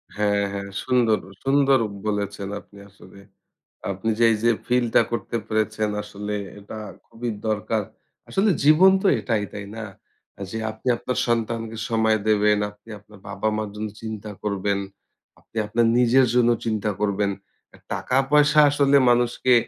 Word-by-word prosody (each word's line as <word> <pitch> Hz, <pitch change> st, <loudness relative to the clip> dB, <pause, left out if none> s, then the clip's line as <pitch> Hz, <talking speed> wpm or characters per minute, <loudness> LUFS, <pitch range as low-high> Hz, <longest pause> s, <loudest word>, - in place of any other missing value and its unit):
হ্যাঁ, 100 Hz, -1 st, +1 dB
হ্যাঁ। 100 Hz, 0 st, -5 dB
সুন্দর, 120 Hz, -4 st, +2 dB, 0.2 s
সুন্দর 135 Hz, -1 st, +4 dB, 0.3 s
বলেছেন 100 Hz, -1 st, -2 dB
আপনি 100 Hz, -, -19 dB
আসলে। 100 Hz, 0 st, -16 dB, 0.7 s
আপনি 100 Hz, +4 st, -3 dB
যে, -, -, +4 dB
এই 110 Hz, -, +1 dB
যে, 120 Hz, -, +5 dB, 0.2 s
ফিলটা 125 Hz, -2 st, +3 dB
করতে 120 Hz, 0 st, -3 dB
পেরেছেন, 110 Hz, 0 st, 0 dB
আসলে 105 Hz, 0 st, -5 dB, 0.2 s
এটা 105 Hz, +2 st, -9 dB, 0.3 s
খুবই 120 Hz, +1 st, -5 dB, 0.2 s
দরকার। 110 Hz, 0 st, 0 dB, 0.5 s
আসলে 200 Hz, +2 st, +2 dB
জীবন 160 Hz, +6 st, +7 dB
তো -, -, +3 dB
এটাই, 105 Hz, 0 st, -1 dB
তাই 100 Hz, -1 st, -6 dB
না? 115 Hz, -1 st, -5 dB, 0.7 s
যে, 110 Hz, -, -4 dB
আপনি 110 Hz, +3 st, -11 dB
আপনার 125 Hz, +2 st, -4 dB
সন্তানকে 115 Hz, -1 st, -1 dB
সময় 110 Hz, -1 st, +2 dB
দেবেন, 105 Hz, 0 st, +4 dB
আপনি 105 Hz, +2 st, -21 dB
আপনার 105 Hz, 0 st, -18 dB
বাবা-মার 105 Hz, +1 st, -2 dB
জন্য 105 Hz, 0 st, -4 dB
চিন্তা 110 Hz, -1 st, -6 dB
করবেন। 100 Hz, -1 st, -1 dB, 0.6 s
আপনি 115 Hz, -, -15 dB
আপনার 115 Hz, +2 st, +2 dB
নিজের 125 Hz, +2 st, +5 dB
জন্য 120 Hz, -1 st, +4 dB, 0.2 s
চিন্তা 110 Hz, -2 st, -1 dB
করবেন। 100 Hz, -1 st, +1 dB, 0.6 s
টাকা-পয়সা 145 Hz, +3 st, +3 dB
আসলে 140 Hz, -1 st, +4 dB
মানুষকে 120 Hz, +1 st, +2 dB
110 Hz, 135 wpm, -23 LUFS, 105-120 Hz, 0.7 s, জীবন